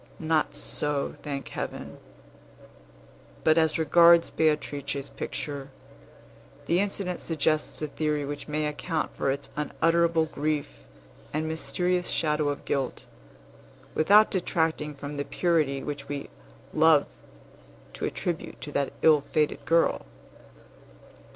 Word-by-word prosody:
Not 160 -1 0
so, 145 -1 -1
thank 140 -2 -5
Heaven! - - -6 1.4
But, 160 +1 +5
as 160 -1 +2
regards 170 +2 +6
Beatrice's 145 -3 -1
picture, 140 -2 -5 1.0
the 175 - +2
incident 195 -2 -1
suggests 155 -1 0
a - - 0
theory 150 0 -1
which 145 0 -6
may 150 0 -1
account 150 +2 -2
for - - 0
its 140 +1 -2
unutterable 165 +2 +2
grief 155 -1 -2 0.6
and 155 +1 -1
mysterious 180 +3 -1
shadow 150 -2 +1
of 145 - -4
guilt, 135 -3 -2 0.9
without 205 +7 +5
detracting 160 -5 0
from 145 +1 -7
the 145 - -1
purity 150 -5 0
which 145 -1 -6
we 145 -1 -5 0.4
love 155 -2 +5 0.9
to - - -3
attribute 170 -2 -4
to 145 - -6
that 140 -1 -1
ill 155 -2 +6
fated 150 -1 0
girl. 165 0 +2
155 Hz, 115 wpm, -27 LUFS, 145-165 Hz, 1.4 s, regards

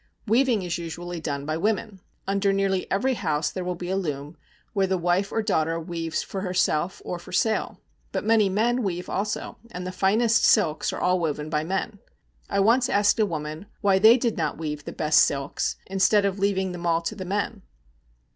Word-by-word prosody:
Weaving 230 -2 +2
is 175 -1 -3
usually 170 +1 -6
done 140 -3 -4
by 155 +1 -1
women. 210 +2 -1 0.3
Under 195 0 +1
nearly 195 -1 0
every 260 +7 +1
house 155 -8 -1
there 185 - -4
will 180 0 -2
be 175 +1 -5
a - - +1
loom, 150 -4 -3 0.4
where 195 -2 +2
the 190 0 +1
wife 175 +3 +1
or 225 - 0
daughter 165 -5 0
weaves 165 -1 -3
for 195 - -5
herself 180 -2 0
or 175 - -4
for 175 - -13
sale. 220 +4 0 0.3
But - - -2
many 215 -2 +4
men 235 +6 +1
weave 180 -4 -3
also, 205 +2 -3
and 180 -5 -6
the 185 - -3
finest 215 +5 +2
silks 160 -8 +3
are - - -5
all 180 0 +2
woven 155 -2 -2
by 150 -1 0
men. 190 +4 -3 0.5
I 200 - +1
once 245 +5 +4
asked 205 -1 +3
a 215 - +3
woman 155 +1 -5
why 195 -1 +4
they 220 +4 +8
did 235 -3 -1
not - - -1
weave 150 -2 -5
the - - -5
best 155 0 +3
silks, 140 0 0
instead 195 +2 +3
of 195 0 -1
leaving 190 -1 +1
them 175 -1 -4
all 165 0 +2
to 190 - -2
the 200 -3 -6
men. 200 +2 -2
190 Hz, 200 wpm, -25 LUFS, 165-205 Hz, 0.5 s, they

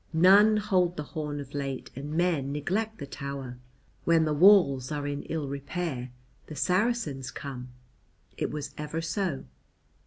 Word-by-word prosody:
"None 200 +6 +6
hold 185 -4 +1
the 150 - -2
horn 150 -3 -3
of 140 -1 -8
late 135 -2 -4
and 140 +3 -6
men 165 -6 +1
neglect 200 +10 -2
the 140 - -6
tower. 140 -3 -6 0.4
When 165 -1 +4
the 155 - +1
walls 150 -7 +5
are 145 -1 -2
in 145 0 -3
ill 160 -3 -3
repair 140 -2 -4 0.4
the 155 - -8
Saracens 180 - 0
come: 130 -2 -7 0.7
it - - -2
was 150 -1 -5
ever 150 +2 -3
so." 175 -3 -2
150 Hz, 150 wpm, -28 LUFS, 140-180 Hz, 0.7 s, None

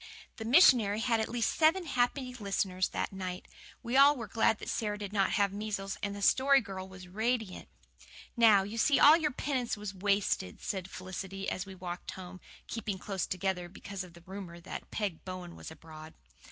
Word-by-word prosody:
The 225 - -6
missionary 230 - +6
had 230 -1 +2
at 220 - -1
least 235 -1 0
seven 335 +3 +3
happy 255 -1 0
listeners 195 -4 -1
that - - -3
night. 185 -1 -5 0.4
We 235 - -4
were 265 - +6
all 285 +1 +8
glad 220 +1 +2
that - - -9
Sara 210 -2 -2
did 205 -1 -6
not 195 -2 +2
have 200 -2 +2
measles, 200 -1 -4
and 200 -1 -3
the 200 - -6
Story 275 +4 +5
Girl 190 -4 -7
was 185 -1 -11
radiant. 220 - -2 0.7
"Now 220 -4 +6
you 210 +4 -5
see 280 +4 +4
all 300 +2 +9
your 320 -2 +1
penance 255 -4 -2
was 205 -2 -6
wasted," 195 - 0
said 190 -2 -4
Felicity, 190 +1 -6
as 185 +1 -4
we 190 - -9
walked 180 -1 -7
home, 185 -1 -10 0.2
keeping 210 -4 -4
close 195 -1 -3
together 185 -1 -2
because 200 +1 -7
of 175 -2 -13
the 170 - -14
rumour 185 -3 -8
that - - -8
Peg 200 -7 -3
Bowen 185 -2 -7
was - - -9
abroad. 160 0 -12
200 Hz, 190 wpm, -31 LUFS, 185-230 Hz, 0.7 s, all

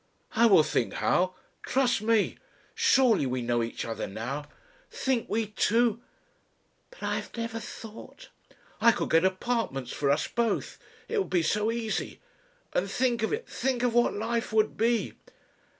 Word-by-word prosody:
"I 230 +1 +5
will 195 -8 +7
think - - -1
how. 185 +1 +1 0.3
Trust 255 -5 +1
me! 220 -1 +1 0.3
Surely 235 - +4
we 125 -1 -2
know 120 0 +1
each 115 0 -4
other 115 - -4
now 125 +8 -5 0.4
Think! 260 -4 -1
We 225 +1 0
two 230 +2 +1 0.4
" - - -42
"But - - -14
I - - 0
have - - -7
never 230 0 -3
thought 225 - -10 0.3
" - - -30
"I 230 +1 +6
could - - -3
get 165 +1 +5
apartments 190 - -1
for 140 - 0
us 140 - +2
both. 235 -3 -1 0.3
It 455 - 0
would 395 - -2
be 175 -3 +2
so 210 +5 +1
easy. 230 -2 -3 0.5
And - - 0
think 245 -2 +1
of 220 - 0
it 470 +2 -3
think 250 -1 -1
of 245 -2 +2
what 240 0 +3
life 230 +3 -2
would 215 -1 +2
be!" 230 +1 +1
225 Hz, 165 wpm, -28 LUFS, 185-240 Hz, 0.5 s, will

